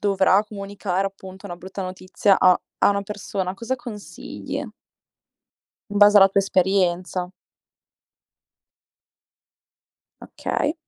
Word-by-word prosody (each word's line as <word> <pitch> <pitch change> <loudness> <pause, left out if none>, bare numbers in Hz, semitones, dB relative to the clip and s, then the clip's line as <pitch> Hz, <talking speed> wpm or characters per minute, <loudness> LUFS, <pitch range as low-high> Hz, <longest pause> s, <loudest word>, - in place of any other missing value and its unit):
dovrà 195 0 +3
comunicare 200 -2 -3
appunto 190 0 -12
una 175 -2 -7
brutta 190 +2 -7
notizia 185 +2 +1
a 185 -1 +5 0.2
a - - +4
una 200 - 0
persona, 195 -2 -4
cosa 235 +5 -3
consigli? 235 -4 -7 1.3
In 205 - -2
base 205 0 +7
alla 195 -1 +8
tua 195 - +2
esperienza. 185 -1 0 2.9
Okay. 295 +2 -2
195 Hz, 100 wpm, -23 LUFS, 185-205 Hz, 2.9 s, alla